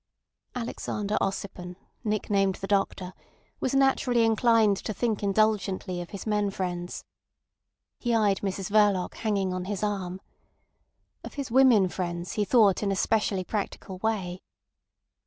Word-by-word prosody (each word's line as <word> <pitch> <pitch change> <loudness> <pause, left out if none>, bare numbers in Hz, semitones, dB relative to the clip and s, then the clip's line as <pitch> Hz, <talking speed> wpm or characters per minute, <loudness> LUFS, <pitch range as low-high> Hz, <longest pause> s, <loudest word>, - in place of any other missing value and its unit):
Alexander 215 -3 -3
Ossipon, 190 -2 -4 0.3
nicknamed 200 -3 +1
the 195 - -6
Doctor, 195 -2 -1 0.5
was 260 - -1
naturally 265 -3 +3
inclined 225 -2 +4
to 215 - -5
think 225 -4 -1
indulgently 195 -3 0
of 175 - -8
his 200 -3 -7
men 210 -2 +1
friends. 180 -2 -4 1.0
He 240 -2 0
eyed 205 -3 +2
Mrs 195 -1 -3
Verloc 205 -4 +3
hanging 200 -4 -1
on 185 0 -3
his 205 +1 -3
arm. 190 -3 -2 1.0
Of - - -9
his 275 -4 -4
women 245 -6 +6
friends 175 -1 -4
he 210 - 0
thought 205 -3 +4
in 200 -2 0
a - - 0
specially 205 -2 +1
practical 195 -1 -4
way. 190 -4 -2
200 Hz, 135 wpm, -27 LUFS, 185-220 Hz, 1.0 s, women